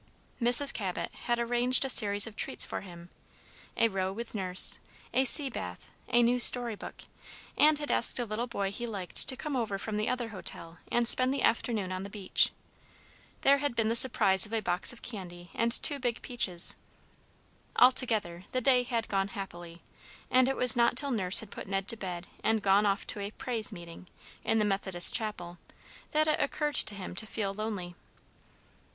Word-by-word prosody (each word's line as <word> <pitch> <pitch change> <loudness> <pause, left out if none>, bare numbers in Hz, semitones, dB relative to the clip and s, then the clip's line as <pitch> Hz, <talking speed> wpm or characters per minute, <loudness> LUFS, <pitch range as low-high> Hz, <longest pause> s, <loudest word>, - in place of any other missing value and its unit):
Mrs. 245 +4 +5
Cabot 190 -4 -6
had 240 -1 -4
arranged 245 +2 +2
a - - -2
series 205 -5 +5
of 225 -2 -11
treats - - -2
for - - -7
him, 175 -2 -13 0.7
a 230 - +2
row 190 -3 -4
with 230 +4 -9
Nurse, 185 -3 +5 0.3
a 265 - +1
sea 280 +2 +6
bath, 90 - -9 0.2
a 240 0 +2
new 245 +1 +1
story 240 -1 +7
book, 205 - -11 0.5
and 305 0 +3
had 295 0 -5
asked - - +5
a 245 - -3
little 225 +3 -5
boy 200 -4 -4
he 240 +4 -6
liked 195 -5 -1
to 260 - 0
come 300 -3 -6
over 225 -5 -3
from 210 +1 -6
the 215 - -2
other 245 -2 -4
hotel 170 -5 -10
and 240 -1 0
spend 255 +2 +4
the 275 - -3
afternoon 220 -4 -1
on 185 0 -5
the 200 - -8
beach. 195 -2 +1 0.9
There 280 +1 +3
had 285 -4 -4
been 225 -2 -1
the 230 - -1
surprise 205 -5 +3
of 215 - -13
a 225 - 0
box 180 -3 0
of 240 - -15
candy 175 -5 -10
and 230 0 -1
two 285 +4 +3
big 245 -3 -4
peaches. 190 -8 0 1.0
Altogether, 220 -9 +2
the 255 - -1
day 255 0 +2
had 235 -2 -4
gone 195 -1 -2
happily, 175 -4 -10 0.5
and 255 0 +3
it 270 - -3
was 250 -3 +2
not 235 0 +1
till 280 0 0
Nurse 190 -5 +6
had 220 - -13
put - - -9
Ned 195 0 -4
to 230 - -1
bed 180 -4 -7 0.2
and 220 -2 -1
gone 200 +1 +2
off 200 0 -2
to - - -7
a 200 0 -5
"praise 225 0 -4
meeting" 170 -1 -12 0.4
in 225 - -1
the 215 - 0
Methodist 195 -3 0
chapel, 180 -6 -5 0.5
that 310 +1 0
it 305 - 0
occurred 295 +1 -3
to 205 - +5
him 190 -2 -8
to 220 +4 -4
feel 200 -3 -5
lonely. 200 -4 -6
220 Hz, 195 wpm, -28 LUFS, 195-245 Hz, 1.0 s, story